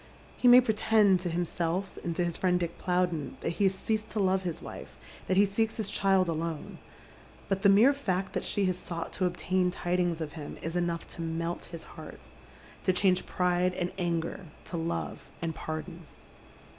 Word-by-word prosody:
He 250 - +2
may 245 +1 +10
pretend 215 -4 +3
to 175 0 -2
himself 175 +2 -2
and 170 -1 -2
to 175 - +1
his 170 -1 -2
friend 180 -1 +2
Dick 170 -1 -4
Plowden 180 -5 0
that - - -1
he - - +5
has 190 0 +3
ceased 215 +2 -2
to 215 - -3
love 190 -1 +2
his 175 -4 -3
wife, - - -9 0.3
that 185 - +1
he 200 - +7
seelcs 220 +3 0
his 210 -3 -2
child 195 -2 +3
alone; 165 -1 -3 0.7
but 195 -1 0
the 200 - +6
mere 220 +8 +7
fact 195 -9 -2
that - - -1
she 200 - +1
has 185 -1 0
sought 165 -2 -5
to 185 - +1
obtain 180 +1 0
tidings 175 -2 0
of 155 -2 -4
him 150 -2 -8
is 165 +1 -3
enough 175 -1 -1
to - - -8
melt 165 +1 -3
his 170 -1 -9
heaii, - - -9 0.7
to 185 - +3
change 185 0 +2
pride 180 0 +1
and 180 -1 -2
anger 170 +1 -2 0.2
to - - -6
love 165 0 -3
and 165 -1 -2
paj 155 0 -4
don. 175 -3 -11
180 Hz, 195 wpm, -29 LUFS, 170-195 Hz, 0.7 s, may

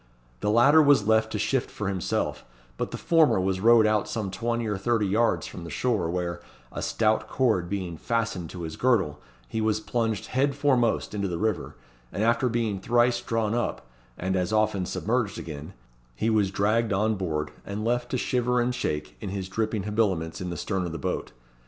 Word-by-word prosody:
The 105 - -1
latter 130 +8 +6
was 140 -8 +5
left 110 0 +3
to - - 0
shift 125 +5 0
for 105 - -4
himself, 95 -2 -2 0.3
but - - -3
the - - -5
former 160 - +4
was 95 0 0
rowed 115 +2 +6
out 110 -1 +1
some 105 -4 -3
twenty 115 +3 -2
or 105 -1 -1
thirty 110 +2 +1
yards 110 +4 +1
from 85 - -8
the 85 - -7
shore, 110 -9 0
where, 85 0 -3 0.3
a - - -5
stout 110 -1 +1
cord 110 -10 +1
being 90 -4 -3
fastened 110 -5 -2
to 90 -2 -7
his 80 -1 -6
girdle, 95 -13 +1 0.3
he 110 - -2
was 110 -1 +1
plunged 110 -2 -1
head 135 +2 +1
foremost 130 -8 +1
into 100 -1 -1
the 85 -2 -3
river; 110 +1 -2 0.4
and 105 - -2
after 120 +2 +2
being 115 -4 -1
thrice 120 +3 +2
drawn 115 -2 -1
up, 120 - -2 0.3
and 95 +2 -1
as 90 +2 0
often 110 -4 +1
submerged 115 -1 -1
again, 75 +2 -7 0.4
he 110 - 0
was 105 -3 +2
dragged 105 +4 +1
on 105 +3 +2
board, 80 -7 -2
and 105 +2 -4
left 120 +1 0
to 130 - -1
shiver 125 0 +1
and 120 +1 +1
shake 75 -10 -3
in 105 - -4
his 95 -1 -4
dripping 110 0 -1
habiliments 95 -6 -1
in 90 - -3
the 85 - -4
stern 95 +1 -2
of 85 - -6
the - - -3
boat. 70 - -3
110 Hz, 195 wpm, -26 LUFS, 95-120 Hz, 0.4 s, latter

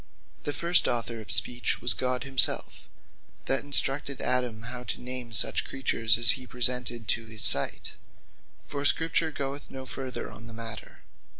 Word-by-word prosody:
The 145 - -3
first 170 +4 +3
author 115 -2 -4
of 110 - -8
Speech 120 0 +1
was 120 - +1
GOD 125 -1 -4
himselfe, 135 -1 0 0.6
that 135 - -2
instructed 140 -1 -2
Adam 125 -3 -2
how 125 +1 -9
to - - -7
name 125 -1 -8
such 115 - +3
creatures 115 -4 0
as 120 -1 +9
he 130 -1 -4
presented 120 -2 +2
to 115 0 +2
his 110 0 +3
sight; - - +3 0.7
For 145 - -8
the 145 - +1
Scripture 165 0 -1
goeth 140 -1 -8
no 130 0 -10
further 130 0 -8
in 115 - -12
this 115 - -11
matter. 115 -1 -11
125 Hz, 165 wpm, -25 LUFS, 115-135 Hz, 0.7 s, as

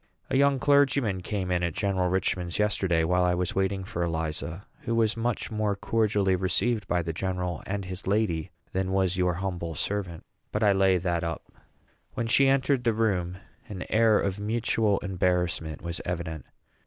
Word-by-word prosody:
A - - +1
young 140 0 +4
clergyman 135 -7 +3
came 95 -1 -3
in 90 -1 +1
at 85 -2 -1
General 95 -3 0
Richman's 90 -1 -1
yesterday, 95 -5 +2
while 90 +2 +2
I 90 0 +2
was 90 0 -1
waiting 95 0 0
for 85 -2 -5
Eliza, 85 +2 -3
who 115 -1 -2
was 110 -1 +2
much 115 0 -2
more 105 -2 0
cordially 100 -2 +1
received 105 +4 0
by 90 -1 +1
the 80 0 -3
general 90 -1 -2
and 100 0 -3
his 90 0 -7
lady 95 -6 0 0.2
than 95 0 -1
was 95 -1 +2
your 90 -2 +1
humble 90 -3 -3
servant; 90 -1 -3 0.3
but 105 - -1
I 105 - +5
lay 95 -1 +4
that 85 -1 -1
up. 85 -1 -3 0.7
When 120 - -1
she 135 +4 +4
entered 135 -1 +2
the 115 -2 +2
room, 90 -5 0 0.3
an 95 -3 -5
air 110 -1 +5
of 100 0 -1
mutual 110 -1 +1
embarrassment 90 -4 -1
was 85 0 -4
evident. 80 -3 -4
95 Hz, 175 wpm, -27 LUFS, 90-110 Hz, 0.7 s, I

